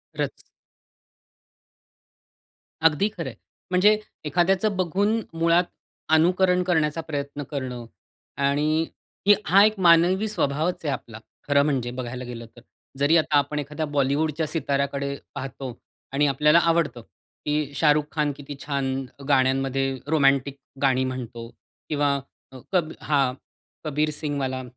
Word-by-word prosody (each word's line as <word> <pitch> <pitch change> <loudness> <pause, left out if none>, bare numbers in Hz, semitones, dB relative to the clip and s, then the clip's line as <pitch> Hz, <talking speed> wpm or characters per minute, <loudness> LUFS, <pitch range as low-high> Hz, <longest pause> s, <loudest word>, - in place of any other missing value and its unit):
खरंच. - - -1 2.5
अगदी 160 +6 +3
खरं - - -4
आहे, - - -11 0.4
म्हणजे 205 +4 +5 0.3
एखाद्याचं 190 +6 +2
बघून 200 +5 +1 0.2
मुळात 170 +1 +4 0.5
अनुकरण 180 +3 +4
करण्याचा 160 -3 +1
प्रयत्न 145 -2 -5
करणं 130 -4 -4 0.6
आणि 150 +3 +1 0.4
ही 205 - +8
हा 195 +5 +6
एक 215 -1 +1
मानवी 180 +4 +5
स्वभावच 160 -3 -1
आहे 145 - +1
आपला, 115 -4 -8 0.3
खरं 140 0 +4
म्हणजे 130 -5 -1
बघायला 125 0 -5
गेलं 120 -1 -7
तर. 120 - -14 0.4
जरी 145 +4 +4
आता 155 -2 +2
आपण 145 +1 0
एखाद्या 150 +2 -3
बॉलिवूडच्या 150 +3 +1
सिताऱ्याकडे 140 -2 -1 0.2
पाहतो 130 -2 -6 0.3
आणि 145 +2 +2
आपल्याला 150 +4 +4
आवडतं, 165 -7 +1 0.4
की 150 -1 -1
शाहरुख 150 +1 +3
खान 150 -2 0
किती 145 0 -8
छान 140 -2 -1 0.3
गाण्यांमध्ये 135 0 +2
रोमॅन्टिक 140 -2 +2 0.2
गाणी 130 -2 +3
म्हणतो 120 -3 -5 0.4
किंवा 145 -2 +1 0.5
कब 175 -4 +1
हां 140 -4 +1 0.5
कबीर 155 0 0
सिंगवाला 140 -4 -3
145 Hz, 120 wpm, -24 LUFS, 135-165 Hz, 2.5 s, ही